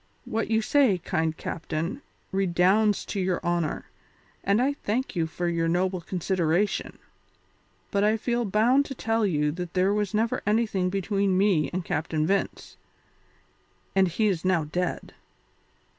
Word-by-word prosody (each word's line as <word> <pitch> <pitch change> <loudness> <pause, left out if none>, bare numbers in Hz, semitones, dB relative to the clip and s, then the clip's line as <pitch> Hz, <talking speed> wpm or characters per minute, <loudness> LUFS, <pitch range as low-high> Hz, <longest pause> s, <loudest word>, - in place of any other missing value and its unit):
"What 225 0 -2
you 220 0 +2
say, 260 -7 +3
kind 160 -2 -1
captain, 165 - -4 0.3
redounds 195 +3 +2
to 200 - -4
your 185 -1 0
honour, 170 -3 -1 0.6
and 200 +2 +2
I 270 +3 +2
thank 255 -2 -3
you 165 -2 0
for 175 +2 -3
your 165 -1 0
noble 180 +2 0
consideration, 180 +2 -1 0.9
but 200 0 +1
I 215 +1 +3
feel 240 +2 -1
bound 235 +7 +3
to 270 - -6
tell 225 -2 0
you 150 -4 +1
that 175 +2 -6
there 185 +2 +3
was 210 -1 -1
never 225 +2 0
anything 210 -4 +1
between 195 0 0
me 185 -8 +3
and 180 -1 -3
Captain 155 0 -1
Vince, 195 +3 -2 1.2
and 190 -1 +4
he 180 +6 0
is 185 -6 0
now 185 -3 +2
dead." 175 +4 -3
190 Hz, 145 wpm, -26 LUFS, 175-215 Hz, 1.2 s, and